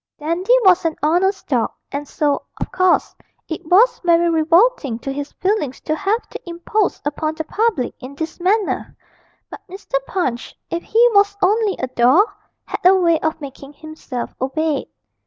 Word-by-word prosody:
Dandy 340 +10 +1
was 365 -2 +5
an 325 -2 -1
honest 365 +6 +1
dog, 245 -5 +1 0.2
and 285 +1 -4
so, 290 0 0 0.2
of - - -4
course, 370 -1 +2 0.3
it 320 - -5
was 410 +9 +4
very 340 0 +3
revolting 330 - +2
to 270 +3 -5
his 285 +1 -5
feelings 370 - -1
to 310 - -1
have 405 +7 -1
to - - -7
impose 350 +4 -1
upon 310 +1 -2
the 320 - -3
public 410 - -1
in 260 +2 -10
this 320 +4 -5
manner; 395 +3 0 0.5
but - - -8
Mr. 460 +7 -3
Punch, 255 - -3
if 335 - -2
he 465 +6 +4
was 405 0 +3
only 415 +1 +2
a - - -2
doll, 255 - +4 0.4
had - - -6
a 370 +2 +7
way 340 -4 +3
of 320 0 -2
making 275 0 -10
himself 305 -5 -7
obeyed. 300 +3 -1
335 Hz, 165 wpm, -19 LUFS, 290-385 Hz, 0.5 s, a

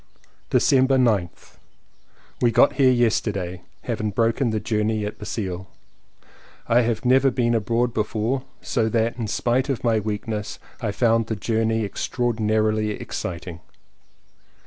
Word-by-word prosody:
December 135 0 +4
9th. 105 -9 0 0.8
We 120 - +4
got 115 - +4
here 135 -3 +5
yesterday, 105 -7 0 0.2
having 110 -3 -2
broken 115 +4 +1
the 110 -1 -1
journey 105 0 -1
at 105 - -6
Basle. 95 -4 -5 1.0
I 120 +2 +4
have 115 +1 -1
never 130 +2 +5
been 120 -2 0
abroad 115 +2 0
before, 110 +4 -1 0.2
so 115 -4 0
that, 115 +2 0
in 115 - -2
spite 120 +5 0
of 135 - -2
my 115 -2 +2
weakness, 105 0 -4 0.2
I 110 - -1
found 115 +1 +2
the 110 - -2
journey 110 +1 0
extraordi 120 +2 -2
narily 110 0 +1
exciting. 85 -1 -6
110 Hz, 130 wpm, -23 LUFS, 105-120 Hz, 1.0 s, here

